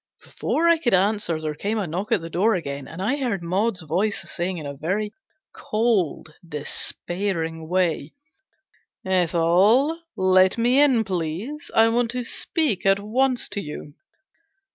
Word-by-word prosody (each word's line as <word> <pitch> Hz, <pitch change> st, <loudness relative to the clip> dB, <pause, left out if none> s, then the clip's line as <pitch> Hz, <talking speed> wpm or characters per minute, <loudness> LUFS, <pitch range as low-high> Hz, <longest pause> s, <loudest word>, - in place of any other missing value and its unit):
Before 335 Hz, +2 st, -1 dB
I 335 Hz, -1 st, +5 dB
could 240 Hz, -10 st, +3 dB
answer 195 Hz, -4 st, +1 dB
there 155 Hz, -1 st, -3 dB
came 205 Hz, +9 st, -2 dB
a 205 Hz, -, -1 dB
knock 180 Hz, +6 st, -4 dB
at -, -, +3 dB
the 165 Hz, -, -7 dB
door 210 Hz, +7 st, +2 dB
again, 140 Hz, -5 st, -5 dB
and 180 Hz, +3 st, -6 dB
I 255 Hz, +8 st, +1 dB
heard 235 Hz, -10 st, -2 dB
Maud's 185 Hz, +2 st, 0 dB
voice 185 Hz, +7 st, 0 dB
saying, 180 Hz, +1 st, -4 dB
in 155 Hz, -, -6 dB
a 140 Hz, -, -5 dB
very 195 Hz, +9 st, -2 dB, 0.4 s
cold, 215 Hz, -9 st, 0 dB
despairing 165 Hz, +1 st, -4 dB
way, 175 Hz, -5 st, 0 dB, 0.4 s
" -, -, -39 dB, 0.2 s
Ethel, 190 Hz, -, +3 dB, 0.2 s
let 185 Hz, +1 st, +4 dB
me 245 Hz, +4 st, +4 dB
in, 260 Hz, -6 st, +4 dB
please: 190 Hz, -, -4 dB
I 225 Hz, 0 st, +6 dB
want 235 Hz, 0 st, +1 dB
to 250 Hz, 0 st, -3 dB
speak 245 Hz, -, -1 dB
at 195 Hz, 0 st, +4 dB
once 250 Hz, +5 st, +1 dB
with 200 Hz, -, -2 dB
you 150 Hz, -1 st, -8 dB
190 Hz, 155 wpm, -23 LUFS, 170-230 Hz, 0.4 s, I